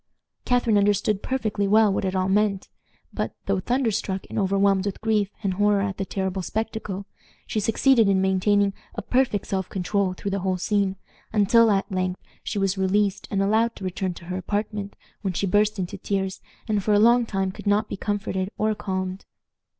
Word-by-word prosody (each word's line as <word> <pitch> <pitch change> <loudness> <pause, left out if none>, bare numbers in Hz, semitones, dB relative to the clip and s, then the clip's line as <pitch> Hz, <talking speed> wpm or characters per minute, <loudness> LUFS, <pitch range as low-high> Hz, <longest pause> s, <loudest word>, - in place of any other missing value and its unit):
Catharine 240 -4 +3
understood 205 0 +1
perfectly 215 -6 -1
well 210 0 +5
what 195 - -1
it 190 0 -1
all 185 0 +1
meant, 200 0 +1 0.4
but, - - -3
though 195 -1 +1
thunderstruck 220 -4 -1
and - - -1
overwhelmed 195 0 +2
with 200 - -4
grief 215 -3 +1
and 195 -2 0
horror 205 +1 +2
at 195 -1 -2
the 195 - -2
terrible 190 0 -2
spectacle, 210 -1 -4 0.4
she 215 - -2
succeeded 225 +1 +3
in 195 -1 +3
maintaining 195 +1 +2 0.2
a - - -4
perfect 250 -6 +1
self 190 -2 -2
control 190 0 0
through 200 +2 -5
the 200 - -1
whole 185 0 -1
scene, 195 +1 0 0.4
until, 220 +2 +5
at 195 -1 +1
length, 185 -1 -1 0.2
she - - -4
was 195 -1 0
released, 195 +1 +1
and 195 -1 +1
allowed 220 +3 +2
to - - -10
return 185 0 -2
to 170 - -12
her 185 +1 -4
apartment, 205 +1 -3 0.3
when 195 -3 -2
she 200 - 0
burst 210 +2 +2
into 190 +1 -4
tears, 190 -1 -2 0.3
and 210 -3 0
for 210 +1 +3
a - - +5
long 235 +3 +5
time 195 -4 -1
could 195 - -9
not 205 +1 +2
be - - -4
comforted 195 -1 -2
or 215 0 +1
calmed. 185 -2 -4
200 Hz, 190 wpm, -24 LUFS, 190-210 Hz, 0.4 s, well